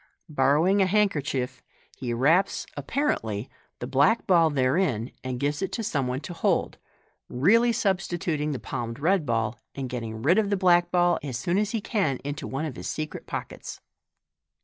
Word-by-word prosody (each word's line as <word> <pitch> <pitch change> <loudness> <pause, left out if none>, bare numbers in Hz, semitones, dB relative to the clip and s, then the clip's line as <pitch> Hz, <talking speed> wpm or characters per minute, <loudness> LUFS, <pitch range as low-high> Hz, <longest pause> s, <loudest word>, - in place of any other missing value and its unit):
Borrowing 150 +8 +3
a 190 - +4
handkerchief, 145 - 0 0.3
he 125 -2 -4
wraps 155 +11 +2
(apparently) 135 - -2 0.3
the - - -5
black 140 - +3
ball 170 -4 +5
therein, 130 - +1
and 130 -1 -4
gives 145 +4 -1
it 190 -1 -2
to 230 - -2
some 145 - -1
one 125 +2 -2
to 175 - -7
hold 165 - 0 0.5
(really 225 - +4
substituting 175 - -1
the 140 - -2
palmed 115 -1 -5
red 165 +2 +1
ball, 115 -1 -1 0.2
and 135 -2 -4
getting 115 -3 -5
rid 175 +9 +4
of 210 -2 0
the 200 - +1
vlack 175 -2 +4
ball 175 -1 +3
as 130 -5 -4
soon 175 +10 0
as 210 -1 0
he 225 -1 -2
can 190 - 0
into 145 +1 -4
one 135 +4 -3
of 145 -6 -6
his - - -5
secret 155 0 -5
pockets). - - -6
150 Hz, 170 wpm, -26 LUFS, 130-190 Hz, 0.5 s, ball